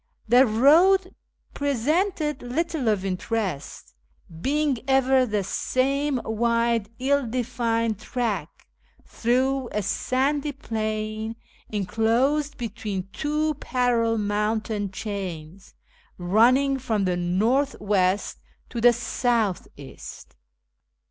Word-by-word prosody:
The 250 +3 +6
road 335 - +4 0.4
presented 300 - 0
little 295 +1 -2
of 205 -3 +1
interest, 190 - -3 0.5
being 285 - +1
ever 265 -1 +3
the 210 -2 -1
same 270 +7 0
wide 230 -1 +1
ill 275 0 +1
defined 230 -2 -1
track, 215 -8 -3 0.4
through 255 +2 0
a 210 - -1
sandy 280 +8 0
plain 215 -3 -3 0.3
enclosed 235 +9 0
between 205 -4 -5
two 305 +3 0
parallel 240 -4 +1
mountain 210 0 -1
chains, 190 -4 -7 0.4
running 250 +9 +3
from 220 -6 -1
the 180 -1 +1
north 220 +11 +1
west 195 -1 0 0.3
to 235 - -4
the 240 +1 +6
south 230 -3 0
east. 140 -2 -11
230 Hz, 95 wpm, -24 LUFS, 210-270 Hz, 0.5 s, The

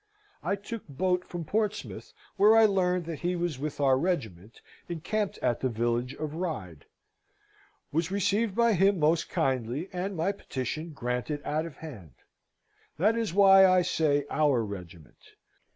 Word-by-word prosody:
I 195 - 0
took 205 +3 -8
boat 180 +5 0
from 175 -3 -6
Portsmouth, 210 +3 -3 0.2
where 215 +2 +6
I 225 - +7
learned 180 -4 +1
that 165 -2 -5
he 180 +1 -1
was 170 -6 -2
with 150 +1 -4
our 135 -2 +3
regiment 115 - -3 0.3
incampt 195 +5 -2
at 120 - +1
the 130 - 0
village 120 +3 -1
of 155 -1 -5
Ryde. 155 - -5 1.1
Was 165 +2 0
received 200 +2 0
by 235 -1 +4
him 195 +1 +3
most 160 +1 +2
kindly, 135 0 -1
and 185 +2 -3
my 170 +5 +1
petition 155 -3 -5
granted 125 +2 -3
out 155 +2 -1
of 150 - -12
hand. 100 - -10 0.8
That 210 +8 +3
is 230 -4 -1
why 195 0 +7
I 185 -1 +4
say 150 -5 +1
our 145 -6 +2
regiment. 90 -5 -10
165 Hz, 150 wpm, -28 LUFS, 130-190 Hz, 1.1 s, I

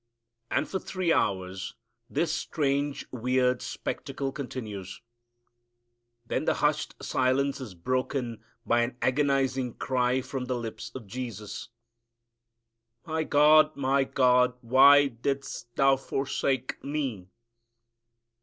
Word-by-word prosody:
And 155 - 0
for 190 - -2
three 185 -2 0
hours 95 -1 -1 0.3
this 165 -2 0
strange, 140 -2 -1
weird 125 +1 +1
spectacle 135 -1 -4
continues. 105 - -6 1.3
Then - - -2
the - - +2
hushed - - 0
silence 135 +2 +1
is 110 -8 -8
broken 125 +4 -2 0.2
by 120 0 +3
an 120 +1 -2
agonizing 135 -2 +1
cry 125 0 +1
from 130 0 -5
the 125 - -2
lips 115 -2 -6
of 130 -4 -7
Jesus, 105 -3 -6 1.4
"My 160 0 -1
God 155 +1 +5
My 135 0 +2
God 125 -1 +3
why 140 +4 +7
didst 135 -1 -4
Thou 135 0 +4
forsake 135 -1 -2
Me?" 135 -10 -3
130 Hz, 105 wpm, -28 LUFS, 120-140 Hz, 1.4 s, why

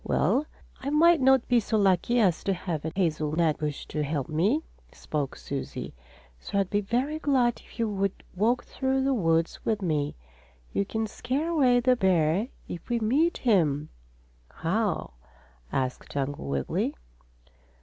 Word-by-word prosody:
"Well, 295 +3 +1 0.3
I 270 - -3
might 325 +2 +5
not 265 -1 +4
be 245 -1 +4
so 220 0 0
lucky 200 +4 +3
as 185 -7 +2
to 195 - +2
have 170 -4 -4
a 160 - -3
hazelnut 160 -3 +1
bush 150 -2 -3
to 150 - -3
help 145 -2 -2
me," 200 - +1 0.3
spoke 145 -3 -4
Susie. 140 -1 -5 0.5
"So 200 - -4
I'd 195 -2 +1
be 205 - +2
very 255 +9 -1
glad 260 -6 +2
if - - -17
you 230 -1 +1
would 195 -2 -2
walk 230 +6 +2
through 265 0 -1
the 270 0 +2
woods 165 -7 +1
with 220 -2 0
me. 150 -4 0 0.6
You 200 - +1
can 220 +2 -2
scare 270 +8 -2
away 255 -7 +4
the 250 +1 +4
bear 185 -1 +2 0.2
if 175 - -8
we 240 -1 +1
meet 285 +10 +2
him." 155 - +2 0.6
"How?" 190 - -1 0.6
asked 130 +1 -3
Uncle 140 - -2
Wiggily. 70 -1 -1
200 Hz, 155 wpm, -27 LUFS, 160-250 Hz, 0.6 s, might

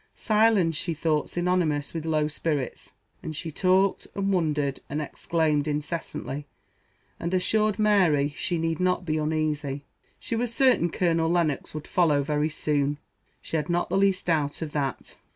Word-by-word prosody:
Silence 215 -6 +3
she 165 +2 -2
thought 155 -1 0
synonymous 175 -5 0
with 165 -1 -4
low 155 -1 +2
spirits; 150 -3 -3 0.3
and 155 - -6
she 160 +1 -4
talked, 185 +4 +2
and 195 0 0
wondered, 150 -6 0
and 150 - -2
exclaimed 155 -1 0
incessantly, 150 -1 -4 0.7
and 170 +2 -1
assured 210 +3 +2
Mary 180 -10 +3
she 175 - -1
need 165 -1 -1
not 180 0 +1
be 155 -2 0
uneasy, 150 -2 -1 0.3
she 230 - -3
was 235 0 -1
certain 245 -8 +3
Colonel 165 -2 +1
Lennox 165 -4 0
would 155 - -5
follow 150 -6 +2
very 150 +1 0
soon; 145 -2 0 0.5
she 160 - -2
had 150 +1 -3
not 175 0 0
the - - -1
least 195 -1 +2
doubt 155 -2 0
of 155 - -6
that. 140 -3 -3
160 Hz, 155 wpm, -26 LUFS, 150-180 Hz, 0.7 s, Silence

